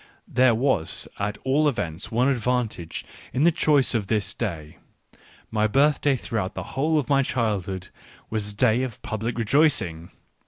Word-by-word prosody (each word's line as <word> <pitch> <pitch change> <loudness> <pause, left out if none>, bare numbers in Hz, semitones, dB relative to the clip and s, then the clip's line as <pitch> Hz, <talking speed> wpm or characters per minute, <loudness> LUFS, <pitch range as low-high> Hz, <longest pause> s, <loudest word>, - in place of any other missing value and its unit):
There 125 -2 +4
was 115 - 0
at 105 +1 -2
all 145 +3 +3
events 85 - -3
one 120 +3 +2
advantage 125 -9 -1 0.3
in 130 +4 +1
the 170 - +6
choice 150 -5 +2
of 110 -4 -1
this 105 -1 0
day: 80 -9 -5 0.7
my 110 -1 +2
birthday 140 +3 +3
throughout 110 -6 -3
the - - -4
whole 155 +4 +1
of 145 - 0
my 140 -1 +4
childhood 100 -8 -2 0.4
was 110 -2 -2
a - - -14
day 115 +2 +3
of 130 -4 -4
public 110 +2 -3
rejoicing. 115 - +2
115 Hz, 155 wpm, -24 LUFS, 105-135 Hz, 0.7 s, the